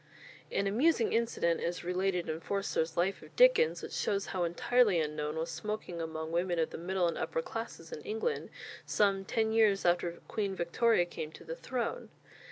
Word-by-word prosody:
An 200 Hz, -, 0 dB
amusing 235 Hz, +4 st, +2 dB
incident 225 Hz, -7 st, +1 dB
is 175 Hz, +1 st, -2 dB
related 180 Hz, 0 st, 0 dB
in 160 Hz, 0 st, -2 dB
Forster's 170 Hz, -3 st, -1 dB
"Life 185 Hz, +3 st, +1 dB
of -, -, -15 dB
Dickens," -, -, +5 dB
which -, -, -6 dB
shows 200 Hz, -1 st, 0 dB
how 185 Hz, -2 st, 0 dB
entirely 200 Hz, +3 st, +3 dB
unknown 150 Hz, 0 st, -2 dB
was 160 Hz, +1 st, -2 dB
smoking 210 Hz, -5 st, -4 dB
among 160 Hz, 0 st, -4 dB
women 175 Hz, +1 st, 0 dB
of 160 Hz, -1 st, +1 dB
the -, -, -6 dB
middle 180 Hz, +1 st, 0 dB
and 170 Hz, -, -2 dB
upper 485 Hz, -, -1 dB
classes -, -, -6 dB
in 475 Hz, -, -6 dB
England 450 Hz, +2 st, -2 dB, 0.3 s
some 195 Hz, -2 st, +2 dB
ten 220 Hz, +3 st, 0 dB
years 215 Hz, -4 st, +3 dB
after 175 Hz, 0 st, +2 dB
Queen 200 Hz, -3 st, -2 dB
Victoria 175 Hz, +3 st, +2 dB
came 155 Hz, -3 st, -6 dB
to -, -, -12 dB
the 165 Hz, 0 st, -5 dB
throne. 255 Hz, -, -3 dB
190 Hz, 175 wpm, -32 LUFS, 170-225 Hz, 0.3 s, Dickens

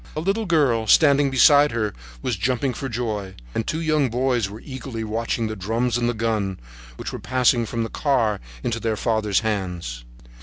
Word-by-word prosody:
A -, -, -2 dB
little 195 Hz, +6 st, -1 dB
girl, 135 Hz, -10 st, +2 dB
standing 140 Hz, 0 st, +5 dB
beside 145 Hz, +2 st, +6 dB
her, 110 Hz, -3 st, -1 dB, 0.3 s
was 125 Hz, -, 0 dB
jumping 125 Hz, +6 st, 0 dB
for 135 Hz, +3 st, -5 dB
joy, 110 Hz, -5 st, -3 dB, 0.2 s
and 115 Hz, -, -2 dB
two 160 Hz, -, -1 dB
young 155 Hz, -4 st, +2 dB
boys 120 Hz, -3 st, 0 dB
were 105 Hz, +2 st, -9 dB
eagerly 130 Hz, -4 st, -6 dB
watching 115 Hz, +1 st, -2 dB
the 110 Hz, 0 st, -3 dB
drum 115 Hz, +5 st, -1 dB
and 120 Hz, 0 st, +1 dB
the 120 Hz, -, -2 dB
gun, 105 Hz, -4 st, -1 dB, 0.4 s
which -, -, -6 dB
were -, -, -5 dB
passing 125 Hz, -2 st, +2 dB
from 115 Hz, 0 st, -2 dB
the 115 Hz, -, -4 dB
car 115 Hz, -8 st, +1 dB, 0.2 s
into 115 Hz, -1 st, -1 dB
their 110 Hz, -1 st, -1 dB
father's 110 Hz, -2 st, +1 dB
hands. 90 Hz, -, -3 dB
115 Hz, 185 wpm, -23 LUFS, 110-135 Hz, 0.4 s, beside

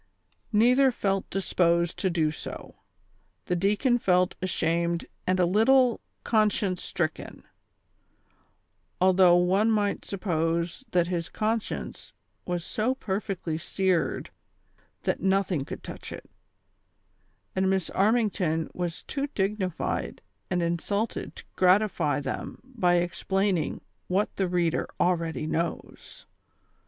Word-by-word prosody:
" -, -, -41 dB
Neither 250 Hz, +5 st, +5 dB
felt 195 Hz, -4 st, -1 dB
disposed 170 Hz, -3 st, +1 dB
to 190 Hz, -, +1 dB
do 160 Hz, -3 st, +1 dB
so. 155 Hz, -, -8 dB, 0.7 s
The 180 Hz, -, 0 dB
deacon 210 Hz, +7 st, +2 dB
felt 180 Hz, -3 st, +2 dB
ashamed 170 Hz, -1 st, 0 dB, 0.2 s
and 185 Hz, 0 st, +2 dB
a 180 Hz, -, +5 dB
little 235 Hz, +6 st, +4 dB, 0.2 s
conscience 210 Hz, -4 st, +1 dB
stricken, 155 Hz, -3 st, -3 dB, 1.6 s
although 185 Hz, -1 st, +6 dB
one 185 Hz, +5 st, +3 dB
might 205 Hz, -2 st, +1 dB
sup 200 Hz, -2 st, -6 dB
pose 170 Hz, +2 st, -1 dB
that 175 Hz, -5 st, +2 dB
his 170 Hz, -2 st, -3 dB
conscience 220 Hz, 0 st, -3 dB, 0.3 s
was 175 Hz, -1 st, -2 dB
so 240 Hz, +5 st, 0 dB
perfectly 190 Hz, -7 st, -3 dB
seared 185 Hz, +1 st, 0 dB, 0.7 s
that -, -, -1 dB
noth 195 Hz, +1 st, +2 dB
ing 145 Hz, -6 st, 0 dB
could -, -, -8 dB
touch -, -, -8 dB
it; -, -, -9 dB, 1.3 s
and 190 Hz, 0 st, +2 dB
Miss 190 Hz, -3 st, 0 dB
Armington 195 Hz, -7 st, +1 dB
was 175 Hz, -2 st, -4 dB
too 280 Hz, 0 st, -3 dB
dignified 190 Hz, -3 st, -2 dB, 0.3 s
and 180 Hz, -2 st, 0 dB
insulted 200 Hz, +6 st, -2 dB
to -, -, -10 dB
gratify 185 Hz, -6 st, +3 dB
them -, -, -5 dB
by 220 Hz, -9 st, +1 dB
explaining 175 Hz, 0 st, 0 dB, 0.3 s
what 195 Hz, +3 st, 0 dB
the 190 Hz, -, 0 dB
reader 175 Hz, -2 st, 0 dB
already 165 Hz, -3 st, 0 dB
knows. 165 Hz, +2 st, -4 dB
185 Hz, 115 wpm, -27 LUFS, 170-205 Hz, 1.6 s, although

